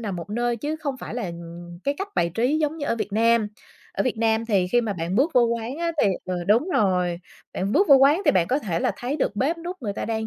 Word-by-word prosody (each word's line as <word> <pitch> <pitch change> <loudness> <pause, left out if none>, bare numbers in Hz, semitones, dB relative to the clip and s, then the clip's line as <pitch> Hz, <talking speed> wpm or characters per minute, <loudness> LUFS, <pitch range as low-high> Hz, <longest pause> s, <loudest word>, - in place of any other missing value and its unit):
nằm 200 -5 -4
một 175 +4 -7
nơi 240 +1 0
chứ 300 +6 -3
không 280 -4 -4
phải 240 - -7
là, 245 - -3
ừm, 170 0 -9
cái 280 +1 +1
cách 395 +1 -3
bài 170 0 +1
trí 260 +7 +1
giống 310 +1 -1
như 285 - -3
ở 230 - 0
Việt 210 -2 -4
Nam. 230 0 +3 0.5
Ở - - 0
Việt 255 -3 -1
Nam 225 0 +1
thì 195 -5 +2
khi 240 - +5
mà 220 -3 -2
bạn 170 +1 -3
bước 290 +6 +3
vô 250 - +6
quán 235 +3 -2
á 340 0 -1
thì - - +4 0.2
ừ, 185 - -3
đúng 235 - +3
rồi, 180 - +1 0.3
bạn 195 +3 -2
bước 395 -3 +3
vô 280 - +9
quán 290 +8 +4
thì - - +6
bạn 175 -3 +2
có 270 - +2
thể 175 - -2
là - - +1
thấy 260 +5 -3
được 205 -7 -1
bếp 315 +9 0
núc 345 -3 -7
người 205 -3 -2
ta - - -4
đang 220 0 -2
230 Hz, 280 wpm, -24 LUFS, 195-280 Hz, 0.5 s, vô